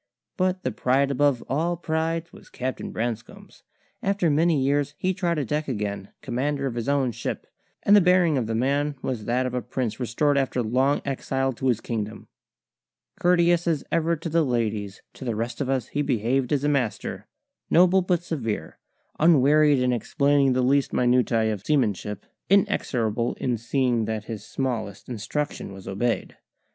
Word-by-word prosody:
But 185 -1 0
the 130 - -1
pride 130 +4 +1
above 140 -2 +2
all 165 +6 0
prides 165 0 -2
was - - -15
Captain 130 +1 -4
Branscome's. 115 0 -5 0.4
After 195 -5 +1
many 160 +1 +3
years 145 +2 0
he 185 0 0
trod 175 -3 -1
a 145 - -1
deck 150 +5 -2
again, 105 -5 -3
commander 140 +3 -1
of 130 - -2
his 120 +2 -3
own 140 -3 +2
ship; - - -5 0.4
and 205 - +6
the 205 - +7
bearing 180 -3 +4
of 125 -5 0
the 115 - -1
man 140 +4 0
was 120 -5 -3
that 125 +2 +1
of 125 - -3
a 125 - -1
prince 125 -1 -3
restored 140 +4 +1
after 130 -2 0
long 130 +6 +1
exile 135 -1 -1
to 130 +2 -3
his 120 -4 +1
kingdom. 110 -2 -5 0.9
Courteous 175 -1 +3
as 160 -4 +1
ever 165 0 +2
to 165 +2 -6
the 165 +1 +2
ladies, 110 -6 -2
to - - -10
the 120 -3 -2
rest 115 +3 -3
of 135 - -1
us 130 -4 -1
he 145 - -1
behaved 130 -1 0
as 145 -2 +1
a - - +2
master, 135 -7 -1 0.4
noble 185 +2 +5
but 180 -1 0
severe, 115 - -4 0.4
unwearied 150 -1 +5
in 125 -1 +2
explaining 140 +2 +2
the 125 0 +1
least 140 +2 +2
minutiae 120 -3 +2
of 100 -2 -7
seamanship, 105 -8 0 0.2
inexorable 120 - +1
in 125 -2 -1
seeing 120 0 0
that 110 -1 -3
his 110 -2 -6
smallest 110 -7 -4
instruction 125 +2 -4
was 95 -1 -11
obeyed. 115 +5 -2
130 Hz, 170 wpm, -25 LUFS, 115-150 Hz, 0.9 s, the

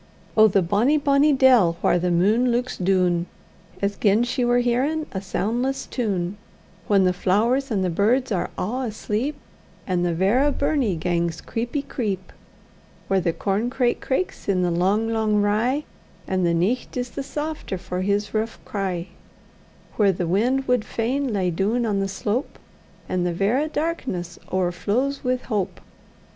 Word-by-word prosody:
Oh! 220 0 +7
the 195 -2 +2
bonny, 215 - +2
bonny 285 +1 +3
dell, 250 -11 +5
whaur 175 - +3
the 180 +1 0
mune 205 +8 +3
luiks 245 +1 0
doon, 180 -2 +1 0.6
As 200 0 0
gin 210 +2 +3
she 245 +1 -1
war 245 0 +3
hearin' 260 +6 +1
a 190 - -4
soundless 240 +7 -1
tune, 200 -6 -2 0.5
Whan 200 -2 +4
the 185 0 +3
flowers 230 +10 +1
an' 200 -5 0
the 185 - +1
birds 235 +8 +2
are 185 - -1
a' 250 +7 -2
asleep, 220 +6 -2 0.5
And 180 -2 0
the 175 -1 0
verra 235 - +3
burnie 280 - 0
gangs 170 0 -1
creepy 240 +5 -3
creep; 205 -9 -4 0.8
Whaur 195 0 +3
the 170 - +1
corn 205 +7 -1
craik 250 -2 0
craiks 265 - -2
in 185 -2 +2
the 175 - +1
lang 195 +6 +1
lang 215 -2 +2
rye, 225 +8 +1 0.4
And 185 -2 +1
the 170 - +2
nicht 210 +10 -1
is 245 0 -3
the - - -4
safter 295 -7 -4
for 180 0 -4
his 200 +2 0
rouch 220 +1 -1
cry; 185 -3 -3 0.9
Whaur 200 -2 +5
the 180 -1 -2
wind 245 +10 +1
wad 250 -3 +2
fain 255 +5 -1
lie 190 -4 0
doon 210 +8 0
on 205 -3 0
the 195 - 0
slope, 205 +6 -3 0.5
And 180 -1 -1
the 175 -1 0
verra 220 - +1
darkness 260 - -3
owerflows 200 +10 0
wi' 255 -1 +2
hope! 210 -6 -3
210 Hz, 160 wpm, -23 LUFS, 185-250 Hz, 0.9 s, Oh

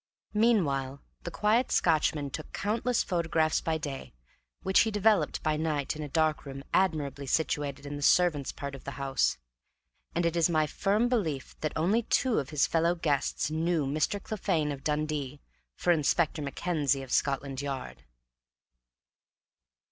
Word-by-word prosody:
Meanwhile 145 - +2 0.2
the - - -5
quiet 215 +7 +1
Scotchman 155 -3 +2
took 155 - -7
countless 230 +4 0
photographs 160 -2 +1
by 160 -1 0
day, 140 - -6 0.5
which 190 0 +4
he 225 - +4
developed 205 -7 +2
by 155 -1 +1
night 155 -3 -1
in 155 - -6
a 150 - -5
dark 155 +1 +1
room 135 -1 -8
admirably 150 -7 0
situated 145 -1 -1
in 145 0 -5
the - - -7
servants' 150 -3 +3
part 140 -1 -6
of 135 - -9
the 140 - -7
house; 135 - +1 0.8
and 170 0 +1
it 170 0 +1
is 170 0 +3
my 155 -2 +2
firm 200 +9 +1
belief 170 - -2
that 155 - -2
only 190 +9 +2
two 245 +1 +1
of 140 -2 -4
his 150 -2 +2
fellow 170 +1 +2
guests 150 -2 -1
knew 160 -1 0
Mr. 155 +8 0
Clephane 185 -8 -1
of 135 -1 -7
Dundee 150 -2 -2 0.4
for 175 - +1
Inspector 160 0 +1
Mackenzie 145 -2 -1
of 130 - -10
Scotland 135 -1 0
Yard. 135 - -5
155 Hz, 155 wpm, -29 LUFS, 140-175 Hz, 0.8 s, which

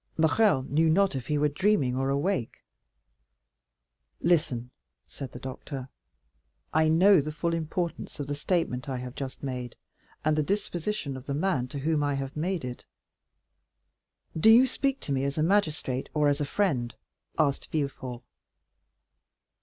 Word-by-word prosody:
Morrel 160 -2 +3
knew 160 +5 +2
not 190 0 +3
if 130 -2 -4
he 150 - +1
were 150 +1 +3
dreaming 150 -4 +1
or 135 +1 0
awake. 140 - -1 1.6
"Listen," 140 -8 +1 0.4
said 135 -3 -8
the - - -8
doctor; 130 0 -7 0.8
"I 160 0 +4
know 180 +2 +6
the 155 +2 -4
full 165 +3 -1
importance 165 0 -3
of 145 - -2
the 145 - -3
statement 145 -3 -1
I 130 - -2
have 125 0 -6
just 135 -1 -6
made, 125 -3 -4 0.5
and 155 0 +3
the 155 - +2
disposition 175 -3 -2
of 130 0 -9
the 140 - -1
man 145 -6 0
to 135 - -7
whom 150 +1 +1
I 145 -1 +1
have 135 0 -4
made 170 -1 -1
it." 125 -1 -6 1.5
"Do 165 +7 +5
you 235 +4 +8
speak 275 +1 -1
to - - -5
me 135 -1 +1
as 140 +1 -2
a 155 - +2
magistrate 155 -8 +1
or 150 -1 +3
as 145 +1 0
a - - +1
friend?" 135 - 0 0.4
asked 140 -1 +1
Villefort. 130 -5 -3
150 Hz, 155 wpm, -28 LUFS, 135-170 Hz, 1.6 s, you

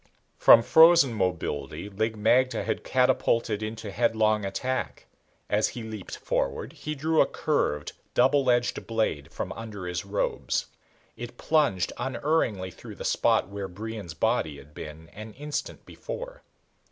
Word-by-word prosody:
From 115 - +8
frozen 160 -4 +6
mobility 85 -5 -2
Lig 110 +2 -2
magte 120 +1 +2
had 110 - -2
catapulted 115 -4 +1
into 110 -1 -5
headlong 110 -1 +2
attack. 100 - -3 0.4
As 105 +1 +2
he 120 - -7
leaped 110 -3 -7
forward - - -2
he 155 0 -5
drew 155 +3 +2
a - - +4
curved, 75 - -1 0.2
double 135 +1 +4
edged 120 0 +1
blade 110 -11 -1
from - - -5
under 105 -4 -7
his 90 0 -3
robes. 100 +1 -1 0.5
It 120 0 -8
plunged 145 - +1
unerringly 125 - 0
through - - -11
the - - -7
spot - - +2
where 100 -1 -5
Brion's 100 -2 -7
body 85 -7 0
had 75 +1 -15
been 75 +2 -9
an 110 +1 -10
instant 150 +4 -5
before. - - -7
110 Hz, 140 wpm, -27 LUFS, 95-130 Hz, 0.5 s, From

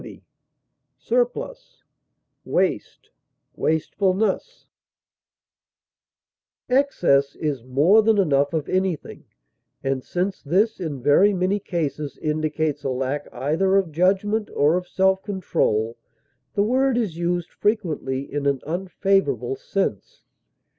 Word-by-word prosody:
intemperance, 245 - -5 0.6
profusion, - - +1 0.7
superfluity, 195 - -1 2.0
Excess 215 - +2
is 145 -6 -3
more 145 - +4
than 220 0 +3
enough 145 -7 +2
of 155 -3 -1
anything, 185 -4 -2 0.6
and, 135 -1 -1
since 185 +2 -2
this 195 +9 +1
in 150 -8 -5
very 185 +9 +5
many 185 +3 +1
cases 155 -6 -3
indicates 155 -1 -1
a 135 - -1
lack 135 +3 -2
either 160 +10 +1
of 190 -5 0
judgment 195 +6 +1
or 150 +4 +3
of 180 0 -2
self 190 +1 +2
control, 160 - -1 0.6
the 200 - +3
word 260 +3 +2
is 210 -9 -1
used 175 0 -1
frequently 165 -11 -1
in 140 0 -3
an 140 -1 +1
unfavorable 190 - 0
sense. - - -3
180 Hz, 105 wpm, -23 LUFS, 145-205 Hz, 2.0 s, very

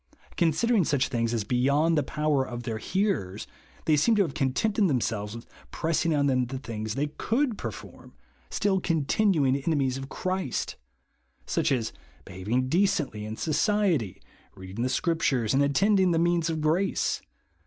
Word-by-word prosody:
Considering 185 +6 +2
such 140 -3 +1
things 115 -2 0
as 115 -3 -1
be 115 +5 -2
yond 145 +6 +3
the 150 - +3
power 150 0 0
of 120 -2 -6
their 115 -3 -3
hearers, 185 - -1 0.4
they 155 - +4
seem 220 +10 +3
to 205 - +4
have 155 -7 -4
contented 185 - +1
themselves 110 - -1
with 115 - -9 0.3
j)ress 165 0 0
ing 165 -2 +1
on 140 -1 +2
them 130 -3 +2
the 130 +2 -5
things 110 -4 -5
they 145 - 0
could 230 - -1
per 120 - -4
form, 105 - -12 0.3
still 195 -2 +1
continuing 160 -3 +2
enemies 140 -3 0
of 135 0 -7
Christ; 185 -7 -2 0.7
such - - 0
as 120 -4 0 0.3
behaving 115 +8 -2
decently 155 - +1
in 110 +1 -6
society, 165 - +1 0.4
reading 95 +3 -7
the 125 - +1
Scriptures, 135 -6 +1
and 135 - +3
attending 190 +7 +3
the 170 - +2
means 170 0 +2
of 160 -1 -2
grace. 165 +6 +1
145 Hz, 165 wpm, -27 LUFS, 120-175 Hz, 0.7 s, they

